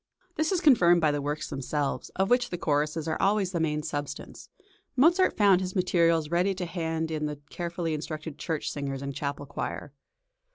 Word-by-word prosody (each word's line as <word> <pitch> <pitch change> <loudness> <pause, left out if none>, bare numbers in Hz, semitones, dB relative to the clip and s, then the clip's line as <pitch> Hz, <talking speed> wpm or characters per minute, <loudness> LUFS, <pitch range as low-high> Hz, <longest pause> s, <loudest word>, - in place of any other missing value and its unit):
This 315 0 0
is 365 -3 +1
confirmed 180 - +6
by 155 -3 +3
the 145 0 -1
works 145 +2 -3
themselves, 140 +1 -2
of 190 +3 0
which 245 0 +3
the 175 - -3
choruses 155 0 0
are 160 - -1
always 195 -2 +2
the 175 - -1
main 150 -1 0
substance; 145 -2 -6 0.5
Mozart 345 +8 +4
found 195 -3 +5
his 185 +1 -4
materials 170 -4 +2
ready 180 +3 +2
to 180 -1 -3
hand 165 -2 -2
in 150 -1 -1
the 150 -1 -6
carefully 170 -1 -3
instructed 155 0 -5
church 160 -3 -2
singers 140 -1 -4
and 140 0 -4
chapel 145 +1 -4
choir. 140 +1 -5
165 Hz, 180 wpm, -28 LUFS, 150-185 Hz, 0.5 s, confirmed